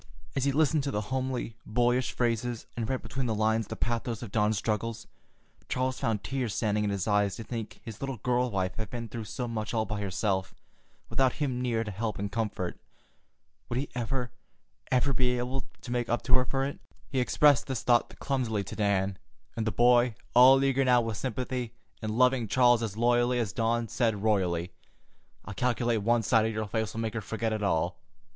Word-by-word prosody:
As 135 - +1
he 140 - +3
listened 155 +1 +3
to - - 0
the 105 -2 -3
homely, 130 -3 -2
boyish 120 +2 +1
phrases 120 -1 -1
and 115 -2 -3
read 130 -1 -1
between 135 -2 -3
the 110 - 0
lines 110 0 +1
the - - -5
pathos 120 0 -2
of 110 - -7
Dawn's 105 0 +2
struggles, 115 +2 -2 0.6
Charles 130 0 -1
found 110 -3 -1
tears 130 -5 -2
standing 105 -2 +1
in 105 - 0
his 100 -1 -2
eyes 105 -2 +2
to 115 - -6
think 115 -2 -6
his 110 -3 -9
little 135 -2 -3
girl 125 +3 +1
wife 95 -3 -2
had 110 -3 -4
been 120 0 -5
through 115 0 -5
so 125 +4 -4
much 110 -1 -3
all 110 -1 +1
by 105 -2 -3
herself, 95 -1 -1 0.5
without 130 -2 +2
him 130 -5 -2
near 115 -3 0
to 105 - -5
help 105 +1 -3
and 100 +1 -3
comfort. 105 -5 -2 0.9
Would 120 - -2
he 140 - -2
ever, 125 0 -2 0.6
ever, 130 +2 +3
be 125 -1 +2
able 125 +2 -2 0.2
to 120 - -7
make 120 -1 -1
up 120 - 0
to 125 - -2
her 130 0 +6
for 135 +1 0
it? 140 - -5 0.3
He 135 - -1
expressed 140 0 +4
this 130 -3 -3
thought 120 -1 +2
clumsily 120 -7 -1
to 95 - -7
Dan, 100 -2 0 0.4
and 115 -1 -2
the - - +1
boy, 120 +1 +4 0.2
all 130 +2 +8
eager 135 0 +3
now 125 -2 +5
with 115 -2 -3
sympathy, 125 -1 -3 0.3
and 110 0 -3
loving 125 -2 +3
Charles 120 +2 +4
as 110 -2 -3
loyally 120 +1 +3
as 115 -6 -1
Dawn, 115 0 0
said 110 -3 0
royally: 90 -5 +1 0.7
"I 105 - -6
calculate 120 0 +1
one 115 +2 +2
sight 110 +1 +3
of 110 - -2
your 110 0 -2
face'll 110 +1 -2
make 110 -1 -2
her 115 - -2
forget 110 +1 -2
it 110 - -2
all. 90 -2 0
115 Hz, 200 wpm, -29 LUFS, 110-125 Hz, 0.9 s, all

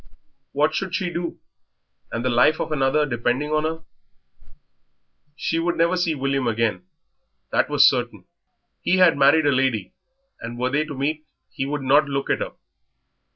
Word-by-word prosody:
What 150 +2 +1
should 185 0 -3
she 175 0 -2
do, 170 0 -4 0.7
and 115 +2 -3
the - - +2
life 125 +6 +3
of - - -3
another 150 +1 +2
depending 130 +3 -1
on 155 0 +1
her? 160 +1 -4 1.5
She 165 - -2
would 170 +1 -1
never 170 +2 +2
see 175 -3 0
William 135 -2 -1
again 110 -5 -1 0.6
that - - +1
was - - +6
certain. - - -1 0.6
He 185 - +1
had 180 -3 +5
married 145 +3 +4
a 145 - +4
lady, 130 -8 0 0.5
and, 115 +1 -7
were 125 +1 -1
they 150 +2 +1
to 145 -3 -8
meet, 155 +3 -2 0.2
he 135 - -4
would 145 -1 -3
not 145 +3 +3
look 140 0 -2
at - - +1
her. - - -4
145 Hz, 165 wpm, -22 LUFS, 130-160 Hz, 1.5 s, was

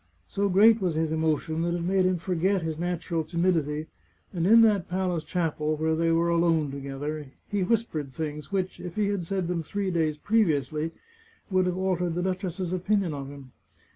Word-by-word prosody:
So 200 - 0
great 215 +4 +6
was 175 -4 0
his 160 0 0
emotion 160 0 0
that 170 +1 0
it 170 - -3
made 185 +1 +2
him 185 -1 +1
forget 185 +2 0
his 160 -1 -3
natural 170 -1 -2
timidity, 160 -3 0 0.5
and 175 -1 0
in 230 +3 +8
that 210 -6 +3
palace 180 -3 -1
chapel 155 -3 -1
where 160 +1 +1
they 165 +1 +1
were 165 +1 +2
alone 165 -4 +2
together, 140 +2 -5 0.2
he 205 -1 -1
whispered 180 - -1
things 150 +3 -5
which, 190 -2 -2
if 175 -2 -7
he 210 -1 +1
had 195 -5 -2
said 190 -2 -1
them 175 -1 -1
three 195 +4 -2
days 160 -3 0
previously, 155 - +1 0.6
would 185 -1 +3
have 180 0 -1
altered 180 -3 0
the 175 - -1
duchess's 185 -1 -2
opin 200 +3 +1
ion 170 -4 -3
of 140 -1 -5
him. 140 -2 -11
170 Hz, 190 wpm, -27 LUFS, 155-185 Hz, 0.6 s, in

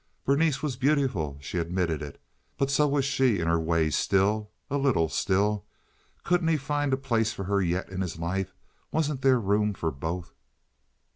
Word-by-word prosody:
Berenice 140 +1 +2
was 140 -5 -2
beautiful, 125 - +1
she 85 +5 -3
admitted 85 -2 -1
it, 75 -1 -8 0.4
but 135 0 +1
so 150 +1 +3
was 140 -1 +1
she 130 -5 +2
in 85 - -1
her 85 0 +3
way 80 -1 +1
still—a 105 - 0
little, 130 - +2
still. 100 +3 0 0.6
Couldn't 175 -1 +2
he 165 -1 +3
find 145 0 -1
a 130 - +2
place 115 -5 0
for 100 - -5
her 100 +1 +1
yet 90 +1 -1
in 95 0 -4
his 85 -3 -3
life? 90 +3 -3 0.4
Wasn't 150 -4 0
there 130 -2 +4
room 105 0 +1
for 80 -3 -2
both? 85 +6 -5
105 Hz, 170 wpm, -27 LUFS, 85-135 Hz, 0.6 s, there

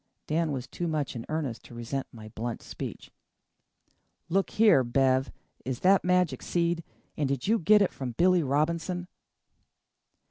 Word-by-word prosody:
Dan 160 0 0
was 130 -3 -3
too 170 +7 -4
much 155 -4 -2
in 115 - -6
earnest 150 -7 -3
to 120 - -12
resent 120 +4 -4
my 110 -2 -11
blunt 115 +2 -5
speech. - - -7 1.2
"Look 195 +3 +1
here, 210 -12 +5
Bev, 130 +2 +2 0.3
is 130 -2 -4
that 190 +1 +5
magic 180 -2 +2
seed? 170 -1 0 0.3
And 145 -3 -1
did 135 -2 -2
you 225 +2 +3
get 210 +4 +5
it 190 - -1
from 130 -3 -5
Billy 180 +6 +4
Robinson?" 165 +5 -1
155 Hz, 150 wpm, -28 LUFS, 130-180 Hz, 1.2 s, here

